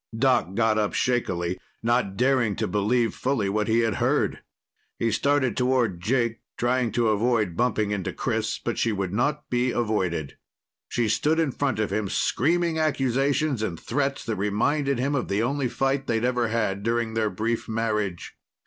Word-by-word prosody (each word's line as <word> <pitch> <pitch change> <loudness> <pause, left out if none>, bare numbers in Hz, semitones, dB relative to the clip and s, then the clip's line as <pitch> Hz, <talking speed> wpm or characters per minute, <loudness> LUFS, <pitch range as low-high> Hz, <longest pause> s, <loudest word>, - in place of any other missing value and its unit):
Doc 125 -6 +2
got 110 -1 +2
up 105 -1 -1
shakily, 90 -8 0 0.2
not 115 -4 +1
daring 125 -5 +2
to - - -1
believe 115 +3 +1
fully 125 -7 -1
what 105 +1 0
he 115 +1 +3
had 115 -5 0
heard. - - +1 0.6
He 115 - 0
started 130 +1 +1
toward 125 -8 +1
Jake, 115 +2 0 0.2
trying 120 -1 +1
to 115 -2 +2
avoid 110 -4 +1
bumping 110 -3 +1
into 100 -3 -2
Chris. - - -2
But - - -3
she 115 - +2
would 95 -3 -2
not 145 +7 0
be 125 +1 +2
avoided. 95 - -1 0.5
She 120 -2 0
stood 150 +9 +1
in 160 -4 +1
front 135 -3 -1
of 110 -1 -1
him, 105 -2 -1
screaming 165 - +1
accusations 140 -2 +1
and 90 -7 -3
threats 140 +2 -2
that 110 - -2
reminded 135 +8 +1
him 135 +4 0
of 140 - -1
the 100 +3 0
only 135 +2 0
fight 135 +2 -1
they'd 115 0 +1
ever 125 -1 +1
had 105 -3 -1
during 115 +1 -1
their 110 -1 +1
brief 110 +5 -2
marriage. 105 -5 -2
115 Hz, 170 wpm, -25 LUFS, 105-130 Hz, 0.6 s, he